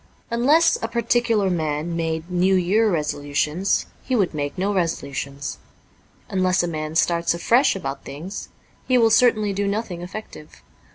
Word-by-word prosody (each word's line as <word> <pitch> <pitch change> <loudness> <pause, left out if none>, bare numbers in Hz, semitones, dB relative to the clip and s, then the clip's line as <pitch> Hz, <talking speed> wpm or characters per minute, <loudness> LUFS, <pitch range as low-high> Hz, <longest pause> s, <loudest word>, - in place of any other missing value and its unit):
Unless 280 +8 +4
a 225 - -1
particular 230 -3 +1
man 160 0 -2
made 160 0 -2
New 185 +2 +3
Year 200 +5 +3
resolutions, 150 +2 0 0.2
he 255 - -2
would 195 -7 +1
make 145 +2 -3
no 195 +3 0
resolutions. 140 - -3 0.7
Unless 185 -1 +1
a - - -1
man 155 -1 -4
starts 170 0 +2
afresh 240 +10 +3
about 135 -7 -5
things, 160 +9 -7 0.4
he 255 - +4
will 225 -2 +4
certainly 215 -3 +4
do 200 +1 -1
nothing 200 -4 -3
effective. 180 -4 -9
180 Hz, 145 wpm, -22 LUFS, 155-215 Hz, 0.7 s, Unless